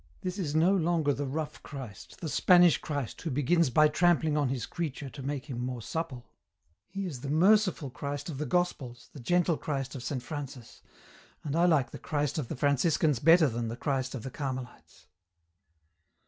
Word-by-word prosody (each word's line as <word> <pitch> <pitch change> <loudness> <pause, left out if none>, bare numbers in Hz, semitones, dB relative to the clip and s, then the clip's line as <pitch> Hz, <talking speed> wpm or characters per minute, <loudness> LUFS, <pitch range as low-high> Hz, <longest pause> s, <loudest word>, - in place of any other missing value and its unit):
This 185 +2 -4
is 155 -5 -2
no 175 +5 +4
longer 165 -5 +1
the 140 +1 -3
rough 150 +2 -4
Christ, 130 -9 -10
the 165 - -3
Spanish 175 +2 +5
Christ 145 -6 -4
who 165 - -3
begins 145 +3 +2
by 155 +5 +5
trampling 160 -1 +2
on 145 -3 +1
His 125 -3 -2
creature 150 -5 -5
to 140 - -9
make 140 0 -4
him 125 -5 -5
more 125 -2 -4
supple; 140 -4 -4 0.6
He 195 +1 -5
is 145 -9 -6
the 140 - -5
merciful 185 -2 +3
Christ 145 +2 -5
of 145 -5 -5
the 150 - -2
Gospels, 130 -7 -2
the 145 - -10
gentle 175 +4 +1
Christ 135 -3 -3
of 135 - -6
Saint 130 0 -4
Francis, 135 -4 -8 0.6
and 145 -1 -3
I 170 +1 +4
like 155 -8 +3
the - - -8
Christ 150 +2 -1
of 135 - -3
the - - -4
Franciscans 145 0 +2
better 165 +2 +6
than 120 -2 -3
the 115 +1 -5
Christ 130 -1 -2
of 120 - -6
the 130 - -6
Carmelites." 130 -3 -7
145 Hz, 190 wpm, -29 LUFS, 130-165 Hz, 0.6 s, better